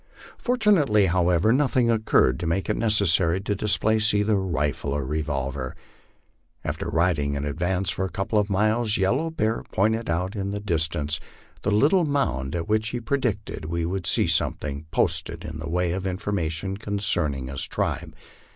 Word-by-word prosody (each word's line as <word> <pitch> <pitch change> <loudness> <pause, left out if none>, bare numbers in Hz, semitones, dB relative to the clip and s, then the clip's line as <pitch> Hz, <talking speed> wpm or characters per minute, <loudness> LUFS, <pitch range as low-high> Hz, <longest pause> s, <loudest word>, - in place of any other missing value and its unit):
Fortunately, 195 - +3
however, 90 +3 +3
nothing 130 -3 +2
occurred 110 - +2
to 85 - -3
make 95 +5 0
it - - 0
nec 115 - 0
essary 95 -1 +2
to 105 - 0
displace 110 +1 +1
either 105 +1 +2
rifle 75 -7 -1
or 70 -2 -2
revolver. 70 -2 -3 0.9
After - - -3
riding 80 -4 +1
in 70 0 -3
advance 90 +5 -1
for 95 - -2
a 95 - -2
couple 105 +3 0
of 105 0 0
miles, 110 +3 +1
Yellow 125 +12 +1
Bear 110 -8 -1
pointed 110 +2 +1
out 90 +4 -1
in 100 -1 -2
the 100 +1 -3
distance 80 -5 -1 0.4
the 100 - -1
little 145 - +4
mound 85 - -1
at 85 -1 -3
which 110 +1 +1
he 120 - -3
predicted 120 - -2
we 85 +1 -2
would 90 0 -3
see - - +2
something 75 +1 0
posted - - 0
in 75 0 -6
the 80 0 -5
way 90 0 0
of 95 +2 -2
information 95 -1 -2
concerning 90 -10 -1
his 65 0 0
tribe. - - -3
95 Hz, 165 wpm, -25 LUFS, 80-110 Hz, 0.9 s, little